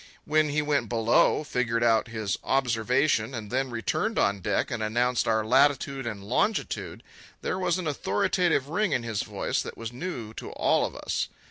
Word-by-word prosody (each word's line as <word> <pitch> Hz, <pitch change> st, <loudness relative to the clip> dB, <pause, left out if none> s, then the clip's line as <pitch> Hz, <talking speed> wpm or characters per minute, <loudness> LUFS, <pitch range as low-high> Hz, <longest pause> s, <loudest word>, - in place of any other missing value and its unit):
When 155 Hz, 0 st, +2 dB
he 150 Hz, +1 st, 0 dB
went 140 Hz, -6 st, 0 dB
below, 115 Hz, +5 st, +3 dB
figured 120 Hz, -4 st, 0 dB
out 115 Hz, -1 st, +3 dB
his 110 Hz, -3 st, -2 dB
observation, 125 Hz, 0 st, +1 dB
and 105 Hz, -3 st, -6 dB
then 130 Hz, +1 st, 0 dB
returned 125 Hz, -, -1 dB
on 100 Hz, 0 st, +2 dB
deck -, -, 0 dB
and -, -, -3 dB
announced 120 Hz, +3 st, +1 dB
our 110 Hz, -1 st, +2 dB
latitude 135 Hz, +1 st, +2 dB
and 105 Hz, -4 st, -5 dB
longitude, 125 Hz, -, -1 dB, 0.4 s
there 185 Hz, -, -1 dB
was 180 Hz, -2 st, +1 dB
an 185 Hz, -, -4 dB
authoritative 145 Hz, -, +1 dB
ring 205 Hz, +6 st, 0 dB
in 125 Hz, -, 0 dB
his 110 Hz, -3 st, -2 dB
voice -, -, -2 dB
that -, -, -7 dB
was 115 Hz, +1 st, -6 dB
new 120 Hz, -7 st, -5 dB
to -, -, -7 dB
all -, -, +2 dB
of -, -, -12 dB
us. -, -, -2 dB
125 Hz, 175 wpm, -27 LUFS, 110-145 Hz, 0.4 s, below